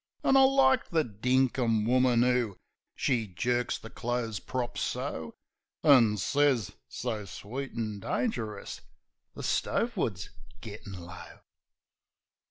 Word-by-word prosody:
An' 270 Hz, -, +4 dB
I 270 Hz, -, +8 dB
like 265 Hz, -1 st, +4 dB
the 160 Hz, -2 st, +2 dB
dinkum 120 Hz, -1 st, +1 dB
woman 125 Hz, 0 st, +4 dB
'oo... 125 Hz, -5 st, +1 dB, 0.4 s
(She 120 Hz, -6 st, 0 dB
jerks 120 Hz, +7 st, -1 dB
the 110 Hz, -, -11 dB
clothes 120 Hz, -4 st, -2 dB
prop, 125 Hz, -2 st, -4 dB
so, 80 Hz, -1 st, -3 dB, 0.5 s
An' 120 Hz, -8 st, +6 dB
sez, 135 Hz, 0 st, +2 dB, 0.2 s
so 110 Hz, -4 st, -4 dB
sweet 125 Hz, +8 st, -6 dB
an' 110 Hz, -3 st, -3 dB
dangerous, 110 Hz, -, -3 dB, 0.5 s
"The -, -, -7 dB
stove 235 Hz, 0 st, 0 dB
wood's 100 Hz, -, -2 dB, 0.3 s
gittin' 100 Hz, -1 st, -9 dB
low." 85 Hz, -, -11 dB
120 Hz, 115 wpm, -29 LUFS, 105-135 Hz, 0.5 s, I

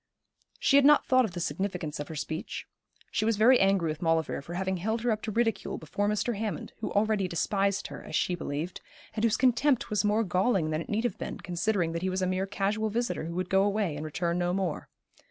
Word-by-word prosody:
She 275 Hz, -, +4 dB
had 280 Hz, -, +6 dB
not 295 Hz, +1 st, +6 dB
thought 255 Hz, -1 st, +4 dB
of 195 Hz, -, -6 dB
the 175 Hz, -, -4 dB
significance 170 Hz, -1 st, -3 dB
of 145 Hz, -, -4 dB
her 160 Hz, -, -7 dB
speech. 155 Hz, +2 st, -4 dB, 0.5 s
She -, -, 0 dB
was 225 Hz, -1 st, +1 dB
very 240 Hz, +4 st, +6 dB
angry 195 Hz, -4 st, +3 dB
with 155 Hz, +3 st, -7 dB
Maulevrier 165 Hz, -4 st, +1 dB
for 170 Hz, +5 st, -8 dB
having 190 Hz, +1 st, -1 dB
held 220 Hz, +6 st, -1 dB
her 245 Hz, -, +2 dB
up 215 Hz, -1 st, -1 dB
to 220 Hz, -, -4 dB
ridicule 225 Hz, +1 st, 0 dB
before 205 Hz, +6 st, -2 dB
Mr. 210 Hz, +2 st, 0 dB
Hammond, 215 Hz, 0 st, -4 dB
who 220 Hz, -, -3 dB
already 205 Hz, -2 st, +1 dB
despised 195 Hz, +3 st, 0 dB
her, -, -, -8 dB
as -, -, -6 dB
she 180 Hz, -, +1 dB
believed, 165 Hz, +1 st, -4 dB, 0.3 s
and 220 Hz, -, -3 dB
whose 230 Hz, -2 st, +3 dB
contempt 260 Hz, 0 st, +2 dB
was 210 Hz, -, +1 dB
more 210 Hz, +2 st, +2 dB
galling 185 Hz, -3 st, +1 dB
than 155 Hz, +1 st, -1 dB
it -, -, -9 dB
need 220 Hz, +2 st, 0 dB
have 240 Hz, -6 st, -2 dB
been, -, -, -5 dB
considering 180 Hz, -1 st, 0 dB
that 170 Hz, 0 st, -3 dB
he 190 Hz, -, 0 dB
was 185 Hz, 0 st, -1 dB
a -, -, +3 dB
mere 185 Hz, +1 st, -1 dB
casual 205 Hz, +2 st, -1 dB
visitor 235 Hz, -5 st, -2 dB
who 170 Hz, +1 st, -5 dB
would 185 Hz, 0 st, -1 dB
go 190 Hz, 0 st, +5 dB
away 200 Hz, -5 st, 0 dB
and 150 Hz, -, -5 dB
return 170 Hz, +3 st, -1 dB
no 175 Hz, 0 st, 0 dB
more. 185 Hz, -5 st, -2 dB
195 Hz, 235 wpm, -29 LUFS, 170-220 Hz, 0.5 s, had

